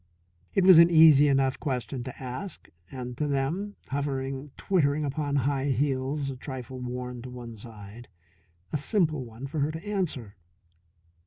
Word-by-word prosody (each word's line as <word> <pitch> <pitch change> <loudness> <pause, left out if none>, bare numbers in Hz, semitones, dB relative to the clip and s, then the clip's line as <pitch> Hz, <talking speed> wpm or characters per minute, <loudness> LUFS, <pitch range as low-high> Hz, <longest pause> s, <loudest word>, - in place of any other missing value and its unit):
It 195 - +4
was 185 -3 +9
an 170 0 +8
easy 155 -3 +7
enough 135 -1 +2
question 130 -2 -3
to 130 - -8
ask 130 +8 -7 0.2
and, 125 -1 -6
to 150 - +1
them, 155 +9 -1
hovering 135 0 -3
twittering 150 -6 +1
upon 145 0 -2
high 140 0 +1
heels 135 +1 0
a - - -6
trifle 130 -1 -7
worn 125 0 -5
to 125 - -8
one 120 -2 -8
side, 110 +1 -11 0.7
a - - +2
simple 155 - 0
one 115 +2 -9
for 145 +3 -4
her 145 +1 +1
to 160 +4 -8
answer. 155 - -2
135 Hz, 155 wpm, -27 LUFS, 125-150 Hz, 0.7 s, was